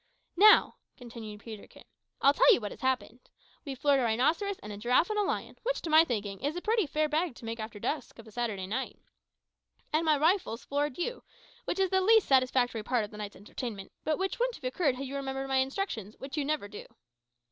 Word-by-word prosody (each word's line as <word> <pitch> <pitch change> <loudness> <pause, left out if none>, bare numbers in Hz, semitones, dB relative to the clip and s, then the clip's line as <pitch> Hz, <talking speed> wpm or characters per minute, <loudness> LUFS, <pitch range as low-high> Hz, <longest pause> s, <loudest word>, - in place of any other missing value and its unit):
"Now," 420 +4 +6 0.2
continued 225 -4 -9
Peterkin, 220 -2 -11 0.4
"I'll 280 - +7
tell - - +6
you - - +5
what 210 -3 -5
has - - -11
happened. 255 -2 -2 0.3
We've 275 -3 -6
floored 285 +1 +3
a - - +1
rhinoceros 295 - +1
and 210 - -9
a - - -7
giraffe 250 - +2
and 420 - 0
a - - +4
lion, 400 - -3
which, - - -1
to 325 - -3
my 315 +1 +8
thinking, 205 - -3
is 290 +4 -2
a 355 - -4
pretty 440 -5 +1
fair 305 +1 0
bag 310 -1 -1
to 235 - -11
make 225 +1 -5
after 220 -1 -6
dusk 270 +3 -3
of 230 - -12
a 220 - -14
Saturday 215 -5 -3
night! 225 +8 -4 1.0
And 310 +2 +2
my 310 -2 +4
big 285 - -4
rifle 365 - +3
has 230 - -9
floored 285 -1 -1
you, 475 +8 -3 0.4
which - - -2
is 385 -1 +1
the 380 0 +3
least 440 +2 +5
satisfactory 255 -3 +2
part 235 0 0
of 205 - -14
the 210 - -10
night's 210 -1 -6
entertainment, 205 0 -7
but 310 -1 0
which 385 +5 -2
wouldn't - - 0
have 305 - -15
occurred 260 +2 0
had 270 +2 -5
you 270 +1 -6
remembered 270 -1 -3
my 265 0 +1
instructions, 260 - -2
which 270 +2 -7
you 295 -2 -1
never 300 -7 -1
do." 205 0 -10
265 Hz, 230 wpm, -30 LUFS, 225-320 Hz, 1.0 s, my